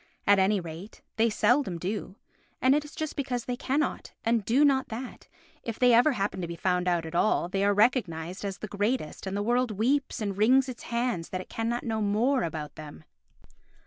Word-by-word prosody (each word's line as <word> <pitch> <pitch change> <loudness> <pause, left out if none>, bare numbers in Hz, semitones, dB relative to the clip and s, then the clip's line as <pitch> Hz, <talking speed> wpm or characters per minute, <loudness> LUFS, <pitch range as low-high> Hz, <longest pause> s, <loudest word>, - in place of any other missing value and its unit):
At 200 -1 +5
any 195 +2 +3
rate, 170 +4 -9
they 225 +1 +4
seldom 220 -2 +2
do, 190 +2 -4 0.4
and 260 +1 +4
it 295 +1 +2
is 295 - -12
just 310 -1 -4
because 250 -4 -2
they 250 - -2
cannot 280 +4 -2
and 230 -1 +2
do 260 +8 +4
not 270 -2 +2
that, 245 +3 -7 0.3
if 230 -2 -5
they 250 -1 +5
ever 245 +6 +5
happen 200 -4 -2
to 170 - -3
be 170 - -6
found 180 +1 0
out 175 -2 +1
at 160 - -7
all, 175 0 +2
they 195 +2 -1
are 200 - +4
recognised 195 -6 +1
as 195 -2 -3
the 215 - -6
greatest 205 -3 -2
and 190 +1 -2
the 205 - -1
world 245 +2 +1
weeps 250 +7 0
and 200 -3 -2
wrings 260 +5 +5
its 250 -2 -7
hands 235 -8 -1
that 185 - -3
it - - -13
cannot 230 +1 -2
know 220 -2 -2
more 230 +6 +2
about 155 -4 -4
them. 145 - -10
215 Hz, 210 wpm, -28 LUFS, 185-250 Hz, 0.4 s, At